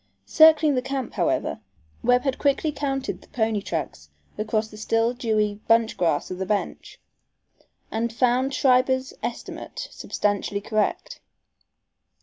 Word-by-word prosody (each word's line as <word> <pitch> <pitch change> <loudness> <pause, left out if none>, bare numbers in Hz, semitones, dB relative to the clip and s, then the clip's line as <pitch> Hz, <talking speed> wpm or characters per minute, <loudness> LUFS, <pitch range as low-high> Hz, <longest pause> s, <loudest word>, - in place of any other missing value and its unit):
Circling 310 - +6
the 255 - +1
camp, 265 -2 -4
however, - - 0 0.4
Webb 245 +1 +3
had 270 -2 -1
quickly 285 +2 +1
counted 275 -2 -3
the - - -18
pony 220 -3 -1
tracks 150 - -5 0.3
across 215 +1 -1
the 215 - -14
still 225 +2 +1
dewy 215 -4 0
bunchgrass 220 -10 +2
of 185 - -5
the 190 - -2
bench, 205 0 -3 0.9
and 230 +1 -1
found 250 +3 +1
Schreiber's 260 0 +2
estimate - - -6
substantially 205 0 -2
correct. 215 +1 -2
230 Hz, 125 wpm, -24 LUFS, 210-265 Hz, 0.9 s, Circling